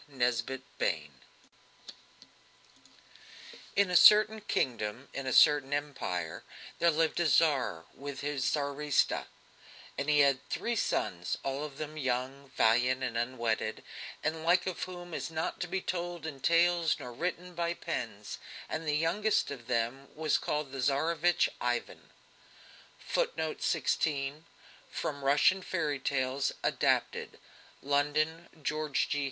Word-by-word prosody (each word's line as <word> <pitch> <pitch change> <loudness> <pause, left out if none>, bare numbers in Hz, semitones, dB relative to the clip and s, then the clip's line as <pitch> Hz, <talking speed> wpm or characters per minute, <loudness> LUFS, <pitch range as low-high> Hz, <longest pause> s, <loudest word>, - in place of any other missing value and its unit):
NESBIT 125 0 -1 0.2
BAIN 75 -2 -1 2.6
In 200 -2 +3
a - - +1
certain 215 +3 +7
kingdom, 120 - -2
in 135 -1 -4
a - - 0
certain 145 0 +5
Empire, 130 - -3 0.4
there 170 - +5
lived 160 +1 +1
a 170 - +3
Tsar 130 - +2
with 140 -1 -7
his 145 -2 -2
Tsaritsa, 145 0 +1 0.7
and 140 - -1
he 150 -1 +5
had 140 -2 +3
three 235 0 -1
sons, 90 - -1
all 135 +1 -2
of 145 -2 -7
them 155 0 -6
young, 135 0 -2
valiant, 125 +3 +3
and 125 -3 -2
unwedded, 115 -2 -1 0.4
the 155 - +2
like 165 +3 +2
of 185 -2 -4
whom 175 -2 -9
is - - -3
not 160 0 -3
to 180 - -2
be 190 +2 -2
told 175 -3 -4
in 145 -4 -6
tales 170 +3 +3
nor 125 - -7
written 180 +5 -3
by 170 0 -1
pens, 115 -9 -5 0.3
and 160 0 -4
the 150 0 +2
youngest 185 +7 +1
of 125 -4 -8
them 125 +3 -1
was 155 -1 +1
called 150 -2 -2
the 135 - -6
Tsarevich 160 +6 +2
Ivan. 120 -1 -2 0.9
[Footnote 160 0 -2
16: 145 -1 0 0.4
From 140 -1 -4
Russian 145 +7 +4
Fairy 155 -6 -1
Tales 130 -1 0
[Adapted]. - - 0 0.5
(London: 150 +4 0
George 150 -1 0
G. 145 - 0
145 Hz, 130 wpm, -31 LUFS, 130-165 Hz, 2.6 s, certain